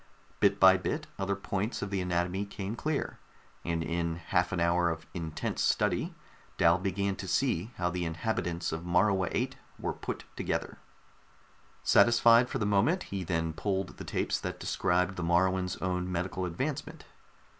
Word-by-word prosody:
Bit - - +3
by 95 0 +8
bit 95 - -2
other 100 +1 0
points 100 +3 -3
of 100 - -4
the 95 -1 0
anatomy 90 +2 0
came 100 +1 -5
clear, 150 +4 -2 0.4
and 85 -1 -1
in 85 0 -1
half 90 +2 0
an 90 - -1
hour 85 +1 +3
of 80 -1 -4
intense 80 -3 -3
study - - +1 0.4
Dal 85 +1 +5
began 100 +1 -1
to 95 - -6
see 110 -5 +1
how 90 -1 0
the 90 0 -2
inhabitants 85 0 -2
of 80 - -3
Morua 90 +2 +2
VIII - - 0 0.3
were - - -2
put - - -5
together. - - -3 1.0
Satisfied 120 +1 +6
for - - -2
the 105 - -1
moment, 105 - +2
he 95 -2 -2
then 80 -1 -1
pulled 95 +2 -2
the - - -7
tapes - - -1
that - - -5
described 90 +2 0
the 90 - -2
Moruans' 90 +2 +2
own 90 0 -1
medical 90 +1 -2
advancement. 130 - -4
90 Hz, 160 wpm, -30 LUFS, 85-100 Hz, 1.0 s, by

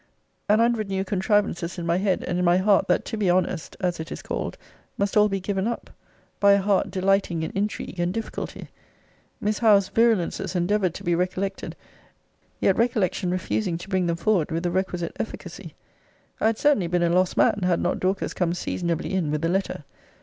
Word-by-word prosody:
An 210 - +5
hundred 230 -2 +1
new 190 0 -1
contrivances 190 -3 0
in 170 - -4
my 170 +1 +2
head, 190 -1 0
and 175 0 -2
in - - +1
my 175 0 +4
heart, 200 +2 +3
that - - +1
to 220 - -4
be 200 -4 +1
honest, 180 -2 0
as 180 -3 -1
it 160 +1 -6
is - - -6
called, - - -4 0.4
must 200 0 -1
all 210 0 +5
be 195 -1 -1
given 195 +1 -2
up, 235 - -4 0.5
by 200 -1 +6
a - - +5
heart 195 0 +1
delighting 190 -3 +1
in - - -3
intrigue 200 -2 -3
and 175 +1 +1
difficulty 225 +3 -5 0.7
Miss 210 0 -1
Howe's 205 -4 +4
virulences 200 -5 +1
endeavoured 185 0 +1
to - - -8
be 175 - +1
recollected 185 +3 -2 0.8
yet 190 - +2
recollection 210 -6 +1
refusing 185 0 -1
to 175 +3 -10
bring 185 -2 +1
them 170 0 0
forward 185 -3 +1
with 165 +1 -2
the 175 - 0
requisite 180 -2 -2
efficacy - - -7 0.6
I - - +3
had 225 -1 +1
certainly 285 - +2
been 175 0 +1
a 170 - +3
lost 180 +1 +2
man, - - +4
had 180 -2 +2
not 175 - -1
Dorcas 190 +1 -1
come 175 -1 0
seasonably 170 0 -2
in 180 -5 0
with 150 +2 -1
a - - +1
letter. 190 -4 -1
185 Hz, 195 wpm, -24 LUFS, 175-205 Hz, 0.8 s, by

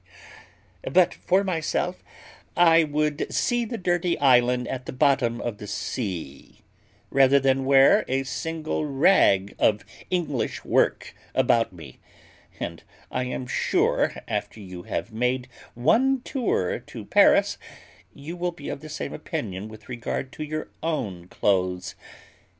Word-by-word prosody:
But 180 +4 +4
for 190 +2 +1
myself, 180 0 -2 0.5
I 165 -1 +6
would 150 0 -1
see 240 -1 +1
the 230 +1 -5
dirty 175 -2 0
island 125 -2 +3
at 130 0 -5
the - - -3
bottom 130 -4 +2
of 115 -3 -4
the 105 - -8
sea, 95 - -5 0.5
rather 135 0 +5
than 135 0 +1
wear 135 0 +6
a 135 +1 0
single 155 +4 -3
rag 135 - +3
of 105 -1 +2 0.2
English 165 -8 -2
work - - +1 0.2
about 120 -4 +3
me: 80 -8 -12 0.6
and - - -5 0.3
I 125 0 -1
am 125 0 -4
sure, 125 - +1
after - - -3
you 90 -3 -9
have 100 +4 -4
made 125 +2 -1 0.3
one 255 - +3
tour 240 - -1
to - - -10
Paris, - - +4 0.5
you 150 +5 -8
will 180 0 -2
be 145 -4 -8
of - - -4
the 155 - -9
same - - -5
opinion 95 +2 -5
with 110 -1 -13
regard 125 +2 -4
to 155 - -6
your 155 +1 -5
own 100 - -3
clothes. 90 -2 0
135 Hz, 135 wpm, -25 LUFS, 110-160 Hz, 0.6 s, I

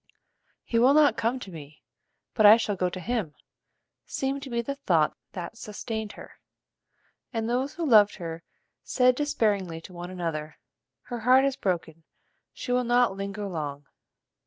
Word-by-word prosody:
"He 230 - 0
will 260 +4 +5
not 305 -1 +5
come 230 +3 0
to 195 - -8
me, 150 -3 -12 0.5
but 215 - +2
I 210 +2 +10
shall 210 -3 -1
go 180 -1 0
to 185 - -7
him," 205 -6 -3 0.7
seemed 270 +1 -2
to 275 - -8
be 235 -1 -1
the 280 - -3
thought 175 - +1 0.2
that 195 +5 -7
sustained 220 0 -5
her, - - -13 0.9
and 225 -2 -2
those 255 +4 -1
who 340 - -2
loved 215 -7 +6
her 165 -3 -6 0.4
said 250 -1 +3
despairingly 215 - 0
to 180 - -12
one 175 0 -7
another: 165 -4 -4 0.5
"Her 240 -2 -6
heart 255 +4 +5
is 275 -1 0
broken: 165 - -3 0.5
she - - -6
will 250 0 +2
not 240 -3 +3
linger 200 +1 -4
long." 145 -5 -5
215 Hz, 160 wpm, -27 LUFS, 175-250 Hz, 0.9 s, I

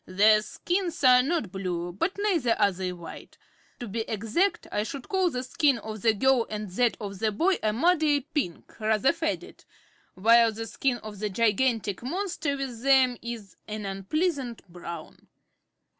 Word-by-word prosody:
"Their 210 +3 +5
skins 350 - -3
are 250 -1 +7
not 280 - -1
blue, 180 -3 -3
but 335 - -2
neither 335 - +1
are 205 -1 +4
they 185 0 -4
white. 175 -2 -10 0.4
To 240 - -5
be 220 +3 -4
exact, 230 - 0
I 205 - 0
should 245 +4 -6
call 375 -2 +2
the 250 -5 -3
skin 275 +1 +2
of 215 -1 -7
the 220 +1 +3
girl 260 +1 +3
and 210 -2 -5
that 240 +5 +1
of 200 -3 -6
the 220 0 +1
boy 350 - +1
a 215 - +1
muddy 300 +3 +3
pink, 270 - -4
rather 220 +4 +2
faded, 330 -1 -4 0.5
while 230 +4 +5
the 225 +1 -6
skin 250 +2 -1
of 210 -2 -8
the 210 0 -1
gigantic 220 -1 +1
monster 315 0 -2
with 255 -4 -5
them 265 -2 +4
is 230 -5 -7
an 210 -1 -5
unpleasant 240 - -2
brown." 170 -2 -9
230 Hz, 165 wpm, -27 LUFS, 205-280 Hz, 0.5 s, are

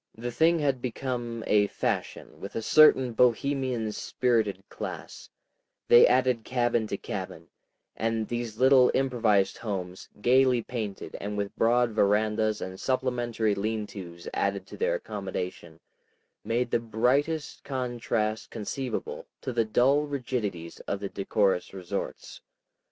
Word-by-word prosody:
The 120 +2 -4
thing 165 +6 +3
had 140 -5 0
become 120 -2 -3
a 105 -1 +3
fashion - - -3
with 100 - -8
a 115 - -1
certain 130 -3 +6
Bohemian 125 -1 +1
spirited 110 -4 0
class; - - -7 0.6
they 120 - +9
added 125 -2 +2
cabin 120 -3 0
to - - -3
cabin, - - -6 0.5
and 115 -1 -1
these 120 -2 -4
little 130 0 +6
improvised 115 -7 +2
homes, 95 -4 -5
gaily 125 +1 +4
painted 110 -5 -5
and 105 +1 -4
with 100 -1 -3
broad 120 +1 +3
verandas 105 +1 +1
and 95 0 -6
supplementary 120 -4 0
leantos 100 -5 -4
added 100 -1 -1
to - - -11
their - - +1
accommodation, - - -5 0.6
made 120 +1 -1
the - - +3
brightest 130 +8 0
contrast 120 -4 -2
conceivable 135 - -4
to 130 - -4
the 115 -1 +2
dull 135 +7 +3
rigidities 115 - -4
of 100 - -2
the 100 -1 -4
decorous 95 -2 0
resorts. 90 -2 -5
115 Hz, 125 wpm, -27 LUFS, 105-130 Hz, 0.6 s, they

